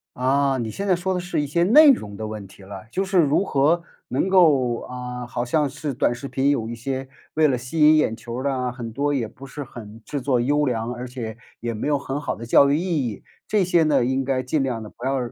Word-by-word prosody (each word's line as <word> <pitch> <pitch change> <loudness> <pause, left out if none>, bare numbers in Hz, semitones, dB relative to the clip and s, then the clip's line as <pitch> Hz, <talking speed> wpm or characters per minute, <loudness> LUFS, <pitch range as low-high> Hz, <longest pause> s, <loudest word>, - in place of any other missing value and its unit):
啊， 135 +1 +1
你 115 -2 -3
现 200 - -4
在 185 - +4
说 180 +2 -2
的 180 - -1
是 175 -3 -2
一 145 - -3
些 170 +5 +1
内 290 - +8
容 105 - -2
的 110 +1 -5
问 105 -2 -6
题 95 - -16
了。 95 +1 -9
就 190 - 0
是 190 -1 -1
如 155 +1 +4
何 160 0 +2 0.3
能 140 +9 0
够， 145 -10 +4
呃 125 0 -6
好 120 -1 -3
像 145 +5 +1
是 150 +2 -5
短 120 - +1
视 125 +3 -7
频 135 +1 +1
有 115 -6 -1
一 120 - -5
些， 130 +3 -4 0.2
为 155 0 +4
了 130 -3 +1
吸 125 +7 -5
引 155 +1 +7
眼 115 -7 +1
球 115 +1 -7
儿 - - -4
的 140 -1 0
啊， 125 -1 -2
很 120 -2 -7
多 140 +5 -1
也 125 -5 -1
不 135 +5 -12
是 145 +2 -6
很 115 -4 -11
制 145 - -4
作 130 -1 +1
优 145 +5 +2
良， 120 -2 -2
而 125 +1 -6
且 120 -3 -6 0.3
也 120 0 -2
没 110 +5 -3
有 150 -1 +2
很 140 +1 -4
好 - - -3
的 115 - -8
教 140 +4 +5
育 145 - +3
意 165 -6 -1
义， 105 -4 -7 0.2
这 210 -2 +2
些 175 -1 +3
呢， 150 -5 +3
应 130 +2 0
该 130 -1 -1
尽 135 +4 0
量 125 -4 -2
地 105 - -9
不 120 - -15
要 135 +1 +1
135 Hz, 280 characters per minute, -23 LUFS, 120-150 Hz, 0.3 s, 内